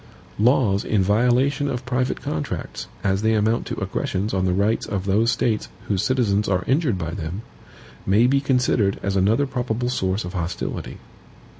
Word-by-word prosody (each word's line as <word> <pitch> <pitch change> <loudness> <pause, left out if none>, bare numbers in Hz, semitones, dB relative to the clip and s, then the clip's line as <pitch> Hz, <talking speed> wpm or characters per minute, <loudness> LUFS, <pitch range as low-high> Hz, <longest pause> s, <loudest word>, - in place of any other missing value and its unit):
Laws 110 -4 +3
in 105 -3 +1
violation 125 +8 +2
of 125 -1 -4
private 125 0 -1
contracts, 80 -1 -4 0.2
as 95 0 +1
they 110 0 +2
amount 110 +2 +1
to - - -4
aggressions 100 +3 -2
on 95 -1 +1
the 90 - +2
rights 100 +5 +1
of 95 -2 -3
those 105 +4 +2
States 115 -2 0 0.2
whose 100 -3 +1
citizens 105 -6 +1
are 95 -2 +1
injured 135 - +1
by 85 -2 -4
them, 85 +3 -5 0.6
may 105 +5 +4
be 135 +2 +3
considered 125 -7 +1
as 100 0 -1
another 105 +9 +3
probable 125 -2 -2
source 95 -5 -1
of 90 - -7
hostility. 85 -1 -4
110 Hz, 165 wpm, -22 LUFS, 95-125 Hz, 0.6 s, may